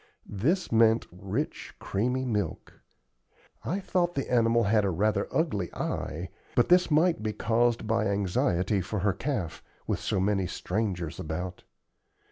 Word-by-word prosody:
This 145 Hz, -, 0 dB
meant 115 Hz, 0 st, +4 dB
rich, 100 Hz, -, -4 dB
creamy 125 Hz, +6 st, -1 dB
milk. 105 Hz, -9 st, -3 dB, 0.8 s
I 190 Hz, -, -1 dB
thought 175 Hz, -2 st, 0 dB
the 135 Hz, -, -2 dB
animal 115 Hz, -1 st, +4 dB
had 105 Hz, 0 st, +3 dB
a 100 Hz, -, +1 dB
rather 100 Hz, +3 st, +1 dB
ugly 105 Hz, -, 0 dB
eye, 85 Hz, +4 st, -3 dB, 0.3 s
but 120 Hz, -, +3 dB
this 180 Hz, 0 st, +5 dB
might 160 Hz, -2 st, +3 dB
be 110 Hz, 0 st, -2 dB
caused 115 Hz, +1 st, +1 dB
by 110 Hz, -1 st, +1 dB
anxiety 95 Hz, 0 st, +1 dB
for 95 Hz, +3 st, -3 dB
her 100 Hz, 0 st, +2 dB
calf, 105 Hz, -, -3 dB, 0.2 s
with -, -, -1 dB
so -, -, -1 dB
many 95 Hz, -1 st, +1 dB
strangers 90 Hz, -4 st, -3 dB
about. 90 Hz, +4 st, -4 dB
105 Hz, 140 wpm, -28 LUFS, 95-120 Hz, 0.8 s, this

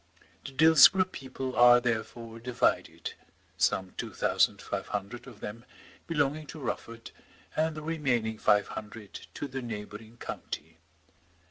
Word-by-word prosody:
The 135 Hz, -, -7 dB
Dillsborough 160 Hz, +5 st, +7 dB
people 130 Hz, -1 st, -5 dB
are 120 Hz, 0 st, +8 dB
therefore 115 Hz, -1 st, -3 dB
divided, 90 Hz, -9 st, 0 dB, 0.4 s
some 95 Hz, -1 st, +1 dB
two -, -, -4 dB
thousand -, -, +2 dB
five -, -, -4 dB
hundred 105 Hz, +6 st, -5 dB
of 120 Hz, -5 st, -12 dB
them 110 Hz, +3 st, -6 dB, 0.4 s
belonging 150 Hz, -1 st, 0 dB
to 155 Hz, -, -8 dB
Rufford, 115 Hz, -3 st, -5 dB, 0.4 s
and 160 Hz, 0 st, +1 dB
the 155 Hz, -, -6 dB
remaining 125 Hz, -9 st, 0 dB
five 105 Hz, -1 st, +3 dB
hundred 105 Hz, -1 st, -8 dB
to 145 Hz, -, -4 dB
the 135 Hz, 0 st, -5 dB
neighbouring 110 Hz, 0 st, -7 dB
county. 80 Hz, -7 st, -7 dB
120 Hz, 130 wpm, -29 LUFS, 110-140 Hz, 0.4 s, are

